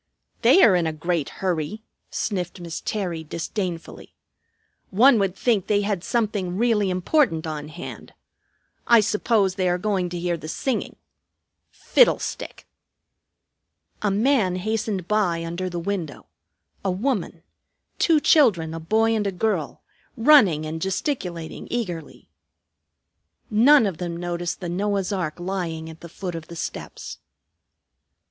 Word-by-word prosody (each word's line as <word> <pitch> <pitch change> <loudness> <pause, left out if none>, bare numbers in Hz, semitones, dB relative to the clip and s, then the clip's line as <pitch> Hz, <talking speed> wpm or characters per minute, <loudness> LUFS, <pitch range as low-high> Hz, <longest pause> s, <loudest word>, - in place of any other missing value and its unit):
"They 385 - +6
are 195 - +7
in 170 -2 +1
a 160 - -2
great 165 -1 -1
hurry," 185 +3 -3 0.3
sniffed 185 -3 -3
Miss 170 -2 -6
Terry 180 -6 -3
disdainfully. 170 +2 -5 0.7
"One 235 +4 +5
would 195 -2 0
think 215 -4 +1
they 205 -1 +2
had 200 -3 -2
something 205 -6 -1
really 220 -3 +2
important 180 - +1
on 150 -2 -5
hand. 165 +3 -9 0.7
I 235 -1 +7
suppose 210 -2 +1
they 185 -1 0
are 175 - +1
going 185 -2 -1
to 175 - -5
hear 175 0 -1
the 155 - -9
singing. 240 - -2 0.7
Fiddlestick!" - - +1 1.4
A 210 - +1
man 210 -2 +2
hastened 205 -1 -2
by 180 -6 +1
under 175 +2 -3
the 175 - -5
window; 170 -4 -4 0.6
a 195 - 0
woman; 190 -4 -2 0.6
two 325 -3 +4
children, 200 - +4
a 165 - -5
boy 220 +7 +2
and 210 -2 0
a - - 0
girl, 215 +4 -2 0.3
running 225 - +5
and 160 +1 -5
gesticulating 185 - -3
eagerly. 180 -10 -5 1.2
None 240 +4 +6
of 190 -5 -3
them 170 -2 -4
noticed 175 0 -3
the 175 - -4
Noah's 200 +2 -1
ark 175 -4 -3
lying 175 -3 -4
at 160 - -15
the 170 - -10
foot 180 +2 -6
of 165 -2 -7
the 170 - -9
steps. - - -6
185 Hz, 135 wpm, -23 LUFS, 170-215 Hz, 1.4 s, are